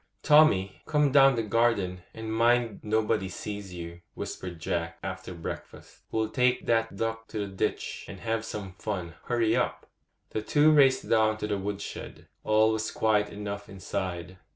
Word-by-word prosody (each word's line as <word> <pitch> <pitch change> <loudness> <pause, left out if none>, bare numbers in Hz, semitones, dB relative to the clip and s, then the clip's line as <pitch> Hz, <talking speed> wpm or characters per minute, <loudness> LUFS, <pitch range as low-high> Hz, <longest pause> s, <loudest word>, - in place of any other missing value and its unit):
'Tommy, 100 -12 +5
come 150 -2 +3
down 135 -1 +6
the 115 - 0
garden, 105 -5 +1
and 110 0 -5
mind 115 -1 +2
nobody 110 -2 0
sees 100 +1 -6
you,' 85 -1 -8
whispered 90 -3 -6
Jack, 85 0 -2
after 95 0 -5
breakfast. 85 -2 -8
'We'll 110 -1 0
take 125 +1 +2
that 115 -3 +1
duck 115 +1 -3
to 110 - -7
the 105 - -1
ditch, 95 -1 -3
and - - -9
have 115 -1 -1
some 100 -4 -6
fun. 90 -6 -4
Hurry 115 -2 +2
up!' - - -1 0.5
The 110 - -2
two 150 +7 +4
raced 135 -3 +5
down 110 -1 +3
to 105 - -3
the 105 -2 -1
wood 100 +1 -3
shed; - - -8 0.2
all 110 +1 +4
was 110 0 -1
quiet 105 -1 +2
enough 100 0 -6
inside. 90 -1 -4
110 Hz, 165 wpm, -28 LUFS, 95-115 Hz, 0.5 s, down